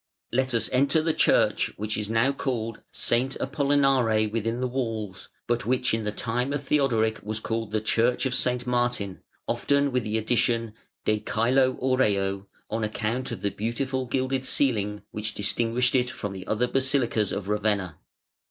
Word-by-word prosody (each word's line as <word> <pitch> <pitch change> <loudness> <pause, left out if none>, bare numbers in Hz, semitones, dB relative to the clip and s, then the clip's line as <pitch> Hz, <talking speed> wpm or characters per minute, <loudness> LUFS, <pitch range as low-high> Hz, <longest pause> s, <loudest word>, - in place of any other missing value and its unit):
Let 130 0 +1
us 115 - +2
enter 140 +5 +3
the 160 0 +1
church - - +3
which 105 +1 -2
is 105 -1 -3
now 115 +4 +3
called 115 -5 -3
"S. - - -1 0.3
Apollinare 135 -6 +2
within 115 +2 -1
the 130 - 0
Walls", 115 -7 -4 0.2
but 120 -2 -1
which 125 -1 +1
in 110 -1 -1
the 105 - -1
time 120 +5 -1
of 145 -1 -2
Theodoric 120 -7 +1
was 110 +1 -3
called 115 -1 -3
the 110 0 -1
Church 115 +4 +1
of 130 - 0
S. 125 -1 +1
Martin, 120 -6 -1 0.3
often 140 +4 +1
with 125 -1 0
the 110 +1 -1
addition 115 0 +1 0.3
"de 110 0 +2
Cælo 125 +5 +1
Aureo", 100 -7 +1 0.2
on 110 +1 -2
account 110 +4 -2
of - - -6
the 100 - +1
beautiful 130 +4 -2
gilded 130 +1 -1
ceiling 105 -7 +1
which 110 +1 -3
distinguished 115 +4 +1
it 125 -2 +2
from 105 -5 -5
the 95 -1 -8
other 110 +3 +1
basilicas 125 -5 +1
of 100 -1 -4
Ravenna. 105 -5 -1
115 Hz, 165 wpm, -26 LUFS, 110-130 Hz, 0.3 s, enter